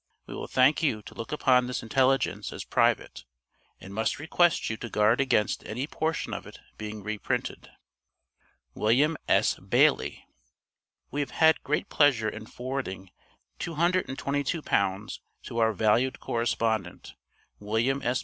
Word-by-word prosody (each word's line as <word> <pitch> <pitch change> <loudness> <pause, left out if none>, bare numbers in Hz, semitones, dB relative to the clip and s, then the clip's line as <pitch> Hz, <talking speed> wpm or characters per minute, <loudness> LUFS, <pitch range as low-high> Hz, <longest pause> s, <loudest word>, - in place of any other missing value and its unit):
We - - -9
will - - -6
thank 130 +5 +3
you 115 -10 0
to - - -11
look 115 - -7
upon 130 -4 +3
this 125 -2 -4
intelligence 135 +3 +1
as - - -6
private, - - +1 0.6
and 95 - -11
must 110 +2 -1
request 160 +3 +2
you 110 - -2
to 120 - -7
guard 105 +4 +3
against 120 -6 +1
any 125 +5 -4
portion 160 +1 -2
of - - -6
it - - -11 0.2
being 105 -1 -7
reprinted. 110 0 -3 1.0
WILLIAM 135 - +2
S. - - +3
BAILEY. - - +2 0.9
We 145 - -3
have 145 - -1
had 160 -1 +4
great 150 +2 -1
pleasure 135 -7 +3
in 110 0 -9
forwarding 120 -9 -5 0.5
£222 145 - -1 0.2
to - - -7
our 110 -1 +4
valued 110 +5 +1
correspondent, 115 -5 -2 0.5
William 115 +7 0
S. 125 0 0
125 Hz, 135 wpm, -27 LUFS, 110-145 Hz, 1.0 s, had